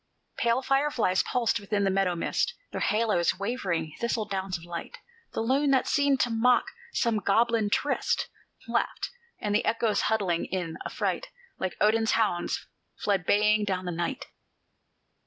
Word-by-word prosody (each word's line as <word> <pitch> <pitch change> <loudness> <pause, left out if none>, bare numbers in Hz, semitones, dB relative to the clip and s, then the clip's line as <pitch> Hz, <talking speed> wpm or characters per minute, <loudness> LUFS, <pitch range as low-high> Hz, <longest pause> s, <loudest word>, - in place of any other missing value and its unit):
Pale 235 +3 +2
fireflies 270 -9 +2
pulsed 235 -2 0
within 200 0 -1
the 195 - +2
meadow 190 -2 +1
mist 325 - -1 0.2
Their - - -4
halos, 210 -5 +2
wavering 185 -7 -2
thistle 235 -2 0
downs 190 -2 -3
of 170 - -13
light; 170 -1 -6 0.4
The - - -1
loon, 270 +5 +2
that 265 -2 +3
seemed 285 -2 +3
to 240 - +1
mock 240 +2 +4 0.3
some 230 - +1
goblin 220 +2 +2
tryst, 280 +6 0 0.4
Laughed; - - -1 0.3
and 210 -1 -1
the 210 - +2
echoes, 225 -1 +1
huddling 190 -6 +1
in 175 -3 -3
affright, - - -2 0.3
Like 185 -1 -3
Odin's 220 +1 +3
hounds, 205 -6 0 0.3
fled 195 -4 0
baying 210 +1 +4
down 185 -2 -2
the 180 - -2
night. 175 +12 -3
210 Hz, 150 wpm, -28 LUFS, 190-235 Hz, 0.4 s, mock